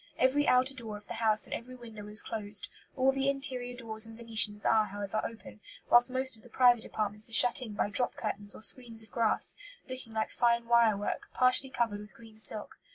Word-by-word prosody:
Every 275 Hz, +3 st, +2 dB
outer 255 Hz, +2 st, +3 dB
door 225 Hz, -5 st, -6 dB
of 205 Hz, -, -16 dB
the -, -, -7 dB
house 215 Hz, -2 st, +1 dB
and -, -, -6 dB
every 255 Hz, +2 st, -7 dB
window 225 Hz, -4 st, -11 dB
is 210 Hz, +1 st, +1 dB
closed; 205 Hz, -2 st, -1 dB, 0.3 s
all 265 Hz, 0 st, +3 dB
the 270 Hz, 0 st, 0 dB
interior 255 Hz, -3 st, -2 dB
doors 220 Hz, -2 st, 0 dB
and 225 Hz, 0 st, -12 dB
venetians 225 Hz, -3 st, +3 dB
are, 220 Hz, -1 st, +3 dB
however, 205 Hz, +1 st, -4 dB
open, 225 Hz, -1 st, -9 dB, 0.3 s
whilst 240 Hz, +1 st, +6 dB
most 260 Hz, 0 st, +1 dB
of 220 Hz, -, -20 dB
the 245 Hz, -, -17 dB
private 240 Hz, -1 st, +4 dB
apartments 210 Hz, +1 st, -3 dB
are -, -, -9 dB
shut 245 Hz, +3 st, +4 dB
in 225 Hz, -4 st, -7 dB
by -, -, -1 dB
drop 245 Hz, +4 st, 0 dB
curtains 205 Hz, -2 st, -4 dB
or -, -, -11 dB
screens 230 Hz, -3 st, -2 dB
of 220 Hz, -, -8 dB
grass, 230 Hz, -2 st, +2 dB, 0.3 s
looking 255 Hz, -3 st, -9 dB
like 220 Hz, 0 st, -2 dB
fine 235 Hz, -1 st, +1 dB
wire 230 Hz, -3 st, +4 dB
work, 205 Hz, -, -4 dB
partially 255 Hz, +1 st, +3 dB
covered 230 Hz, -5 st, -2 dB
with 210 Hz, 0 st, -13 dB
green 225 Hz, -2 st, -16 dB
silk. 215 Hz, -1 st, -3 dB
230 Hz, 215 wpm, -30 LUFS, 215-250 Hz, 0.3 s, whilst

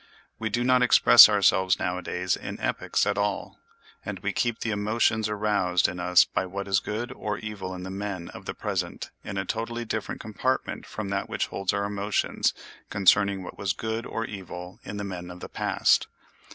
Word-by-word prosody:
We 110 Hz, -1 st, -2 dB
do 120 Hz, +3 st, 0 dB
not 125 Hz, 0 st, +4 dB
express 120 Hz, -2 st, +9 dB
ourselves 95 Hz, -2 st, +3 dB
nowadays 90 Hz, 0 st, -1 dB
in -, -, -7 dB
epics -, -, 0 dB
at 105 Hz, 0 st, 0 dB
all; 100 Hz, -1 st, -2 dB, 0.4 s
and -, -, -5 dB
we -, -, -3 dB
keep 120 Hz, -2 st, -1 dB
the 115 Hz, -, -1 dB
emotions 110 Hz, +1 st, +1 dB
aroused 105 Hz, -4 st, +1 dB
in 90 Hz, -, -5 dB
us 90 Hz, 0 st, +5 dB
by 95 Hz, -, -2 dB
what 100 Hz, +2 st, -5 dB
is 95 Hz, -1 st, +3 dB
good 110 Hz, +5 st, -4 dB
or 105 Hz, -5 st, -4 dB
evil 100 Hz, -4 st, -6 dB
in 90 Hz, -, -7 dB
the 95 Hz, -, -6 dB
men 95 Hz, -3 st, -4 dB
of -, -, -11 dB
the -, -, -5 dB
present -, -, -3 dB
in 100 Hz, -, -5 dB
a 95 Hz, -, -1 dB
totally 115 Hz, +3 st, -3 dB
different 110 Hz, -1 st, -4 dB
compartment 120 Hz, +4 st, -2 dB
from 105 Hz, -2 st, -5 dB
that 100 Hz, 0 st, -2 dB
which -, -, -1 dB
holds 95 Hz, -1 st, -1 dB
our 100 Hz, 0 st, -1 dB
emotions 100 Hz, 0 st, 0 dB, 0.3 s
concerning 100 Hz, -1 st, +3 dB
what -, -, -10 dB
was 95 Hz, -2 st, 0 dB
good 110 Hz, +3 st, -4 dB
or 115 Hz, -, -3 dB
evil 90 Hz, -3 st, -8 dB
in 105 Hz, -, -6 dB
the 100 Hz, -, -3 dB
men 90 Hz, -3 st, -6 dB
of 90 Hz, 0 st, -9 dB
the -, -, -7 dB
past. -, -, +2 dB
100 Hz, 190 wpm, -26 LUFS, 95-110 Hz, 0.4 s, express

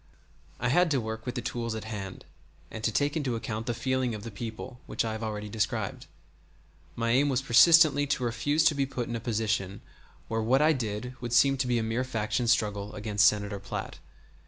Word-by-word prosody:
I 125 Hz, -, 0 dB
had 175 Hz, +6 st, +4 dB
to 140 Hz, -3 st, +2 dB
work 110 Hz, +1 st, -5 dB
with 125 Hz, -, -3 dB
the 120 Hz, -, -3 dB
tools 115 Hz, -1 st, -3 dB
at 110 Hz, -, -5 dB
hand 105 Hz, -4 st, -7 dB, 0.5 s
and 110 Hz, -, -7 dB
to 115 Hz, -, +1 dB
take 145 Hz, +6 st, 0 dB
into 135 Hz, -6 st, -1 dB
account 115 Hz, 0 st, -4 dB
the 120 Hz, -, 0 dB
feeling 130 Hz, -2 st, -1 dB
of 105 Hz, -, -8 dB
the 115 Hz, -, -7 dB
people, 115 Hz, +3 st, -7 dB
which -, -, -1 dB
I 110 Hz, -, -2 dB
have 110 Hz, 0 st, -5 dB
already 105 Hz, -1 st, -4 dB
described. 105 Hz, 0 st, -2 dB, 0.9 s
My 115 Hz, 0 st, 0 dB
aim 140 Hz, +4 st, +3 dB
was 135 Hz, -1 st, 0 dB
persistently 145 Hz, +3 st, +6 dB
to 135 Hz, -2 st, -1 dB
refuse 125 Hz, +7 st, +1 dB
to 155 Hz, -, +5 dB
be 140 Hz, -2 st, 0 dB
put 125 Hz, -3 st, -4 dB
in 120 Hz, -, -4 dB
a -, -, -2 dB
position 110 Hz, -4 st, -2 dB, 0.5 s
where 115 Hz, 0 st, -1 dB
what 125 Hz, +5 st, +3 dB
I 155 Hz, +2 st, +4 dB
did 120 Hz, -1 st, -4 dB
would 120 Hz, -1 st, -4 dB
seem 135 Hz, +3 st, +5 dB
to 130 Hz, -1 st, -1 dB
be 120 Hz, -1 st, +1 dB
a 115 Hz, -, 0 dB
mere 115 Hz, +3 st, -1 dB
faction 120 Hz, -1 st, -2 dB
struggle 105 Hz, -3 st, 0 dB
against 105 Hz, -1 st, +3 dB
Senator 100 Hz, -1 st, 0 dB
Platt. 95 Hz, -1 st, -6 dB
115 Hz, 210 wpm, -28 LUFS, 110-130 Hz, 0.9 s, persistently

